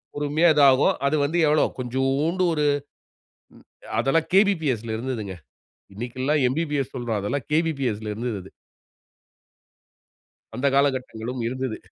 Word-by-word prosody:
பொறுமையா 150 +4 +2
இது 150 - +3
ஆகும். 130 +2 +3
அது 145 +2 +2
வந்து 165 +4 -1
எவ்ளோ, 150 0 +4
கொஞ்சோண்டு 135 +8 0
ஒரு 150 -1 0 1.3
அதெல்லாம் 155 +4 +1
கேபிபிஎஸ்ல 150 - +2
இருந்ததுங்க. 110 -6 -4 0.6
இன்னைக்குலா 130 +6 -2
எம்பிபிஎஸ் 145 -2 -2
சொல்றோம். 120 -4 -2
அதெல்லாம் 120 +6 -3
கேபிபிஎஸ்ல 135 -10 0
இருந்தது 115 -1 -3
அது. 95 - -14 2.1
அந்த 135 +3 0
காலகட்டங்களும் 130 -3 -1
இருந்தது. 130 -2 -3
130 Hz, 105 wpm, -24 LUFS, 120-150 Hz, 2.1 s, எவ்ளோ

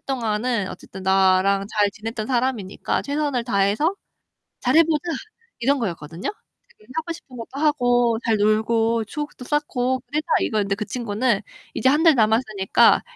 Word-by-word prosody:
동안은 230 -4 -1
어쨌든 190 - -10
나랑 190 +1 +3
잘 210 -2 +1
지냈던 220 +2 -6
사람이니까 240 -6 -1
최선을 285 -4 -1
다해서 215 - +1 0.6
잘해 330 - +5
보자. 310 -1 -1 0.5
이런 275 +4 +2
거였거든요. 170 -5 -4 0.4
그니까 215 +4 -17
하고 325 +1 -2
싶은 265 -6 -13
것도 245 +4 -7
하고, 245 -5 +3
잘 225 -2 +2
놀고 225 +2 +2
추억도 295 +2 -6
쌓고 260 -3 0
그래보자. 305 +2 -3
이거였는데 205 -2 0
그 210 - -4
친구는 230 -2 -1 0.3
이제 260 - +2
1 295 +3 +2
달 325 -2 +6
남았으니까 215 -4 +3
230 Hz, 335 characters per minute, -22 LUFS, 205-265 Hz, 0.6 s, 달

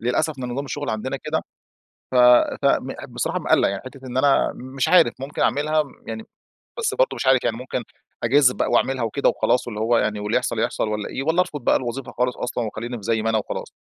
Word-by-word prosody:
للأسف 135 +4 -1
ده 125 - -3
نظام 130 +3 -3
الشغل 145 -2 -4
عندنا 120 +5 -3
كده. 155 +3 -2 0.7
ف - - -3 0.5
ف - - -5
مح - - 0
بصراحة - - -2
مقلّق، - - +3
يعني 100 0 -4
حتة 130 0 -10
إن 125 0 -6
أنا 140 +1 +3
مش 130 +1 -3
عارف 180 -10 +5
ممكن 135 +2 -3
أعملها 155 +1 +2 0.2
يعني، 110 0 -6 0.5
بس 450 -2 0
برضو - - +1
مش - - -3
عارف 130 -1 +4
يعني 115 -1 0
ممكن 125 0 -4 0.4
أجازف 125 +1 +4
بقى - - -1
وأعملها 130 -2 +1
وكده 125 +6 +1
وخلاص 125 - +1
واللي 105 -2 -5
هو 115 +1 +3
يعني 105 -1 -1
واللي 105 0 -1
يحصل - - -2
يحصل - - -1
والّا 105 -1 -3
إيه، 135 - -4
والّا 160 +5 +2
أرفض 150 -7 -3
بقى - - +4
الوظيفة 125 +1 -4
خالص 125 0 -1
أصلًا 120 -1 -3
وخلّيني 115 +3 -5
في 105 - -10
زي 110 +1 0
ما 115 - +1
أنا 110 - +2
وخلاص؟ 105 - -5
125 Hz, 220 wpm, -22 LUFS, 115-140 Hz, 0.7 s, عارف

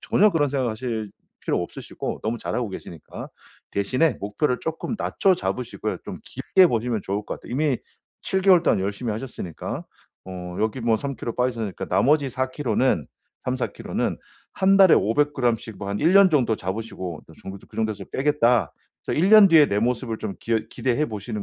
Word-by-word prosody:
전혀 210 +2 +3
그런 155 -5 +1
생각 130 -3 0
하실 110 -2 -4 0.3
필요 - - 0
없으시고 - - -6
너무 115 +2 -2
잘하고 120 -2 -3
계시니까 85 -4 -9 0.4
대신에 130 +11 +1
목표를 125 +6 -1
쪼끔 160 +7 -3
낮춰 195 -2 +2
잡으시고요. 125 -8 -3
좀 - - -6
길게 190 -1 +3
보시면 115 -2 -1
좋을 100 +1 -2
것 - - -5
같아요. - - -10
이미 140 0 +1 0.5
7 190 - 0
개월 185 -3 +6
동안 - - +3
열심히 100 +5 -2
하셨으니까 105 -7 -5 0.4
어 90 -1 -7
여기 110 +4 -1
뭐 115 -1 +2
3 140 +3 -4
키로 115 - -5
빠지셨으니까, 120 -5 -2
나머지 145 +1 +3
4 130 0 -2
키로는 125 - +1 0.4
3-4 130 0 -2
키로는 - - -2 0.4
한 195 +1 +4
달에 190 -3 +8
500 145 +8 +2
그램 120 -4 +1
씩 110 -2 -10
뭐 100 - -5
한 100 +1 -2
1 165 - +3
년 195 -1 +7
정도 125 -8 +2
잡으시고. 95 -4 -5
'그 80 - -16 0.4
정도에서 110 -1 -2
빼겠다.' 125 - +2 0.3
그래서 - - -2
1 180 +5 +3
년 215 -2 +9
뒤의 160 -4 +6
내 100 +1 0
모습을 115 -1 -1
좀 105 -3 -4
기여 115 -1 0
기대해 135 +4 0
보시는 105 -1 -5
120 Hz, 355 characters per minute, -24 LUFS, 110-150 Hz, 0.5 s, 년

